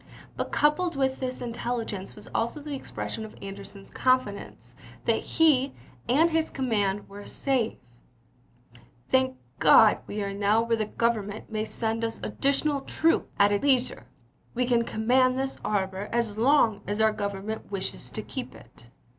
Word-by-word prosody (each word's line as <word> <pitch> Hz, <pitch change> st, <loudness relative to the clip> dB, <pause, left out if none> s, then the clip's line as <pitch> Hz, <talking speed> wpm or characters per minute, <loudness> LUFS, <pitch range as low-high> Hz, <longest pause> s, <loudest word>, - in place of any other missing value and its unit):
But -, -, -3 dB
coupled 335 Hz, +4 st, +2 dB
with 265 Hz, -1 st, 0 dB
this 255 Hz, -1 st, -4 dB
intelligence 230 Hz, -4 st, -4 dB
was 210 Hz, -, -13 dB
also 235 Hz, +6 st, -1 dB
the 295 Hz, 0 st, -6 dB
expression 245 Hz, -4 st, -5 dB
of 220 Hz, -, -10 dB
Anderson's 195 Hz, 0 st, -9 dB
confidence 255 Hz, -6 st, -1 dB, 0.3 s
that -, -, +2 dB
he 285 Hz, -4 st, +3 dB, 0.4 s
and 315 Hz, +7 st, +4 dB
his 320 Hz, 0 st, +1 dB
command 205 Hz, -6 st, -1 dB
were 200 Hz, +1 st, -10 dB
safe: 255 Hz, -3 st, -1 dB, 0.7 s
" 120 Hz, 0 st, -27 dB
Thank 260 Hz, 0 st, +3 dB, 0.2 s
God, -, -, +7 dB
we 210 Hz, 0 st, -3 dB
are 200 Hz, 0 st, -3 dB
now 205 Hz, +3 st, +2 dB
where 230 Hz, 0 st, +1 dB
the 215 Hz, -, 0 dB
Government 215 Hz, -2 st, -1 dB
may 215 Hz, 0 st, -1 dB
send 225 Hz, 0 st, -2 dB
us 225 Hz, 0 st, -2 dB
additional 280 Hz, +1 st, 0 dB
troops 325 Hz, +4 st, +1 dB
at 200 Hz, 0 st, +5 dB
its 205 Hz, -, 0 dB
leisure... 255 Hz, -, +1 dB, 0.5 s
We 250 Hz, +1 st, +1 dB
can 240 Hz, -1 st, +2 dB
command 255 Hz, +4 st, +2 dB
this 270 Hz, 0 st, -2 dB
harbor 195 Hz, 0 st, -1 dB
as 235 Hz, -3 st, 0 dB
long 230 Hz, -2 st, +3 dB
as 205 Hz, +1 st, -2 dB
our 220 Hz, 0 st, +4 dB
Gov 200 Hz, -1 st, -2 dB
ernment 215 Hz, +3 st, -6 dB
wishes 185 Hz, -, -5 dB
to -, -, -6 dB
keep -, -, -6 dB
it." -, -, -17 dB
230 Hz, 160 wpm, -27 LUFS, 205-260 Hz, 0.7 s, God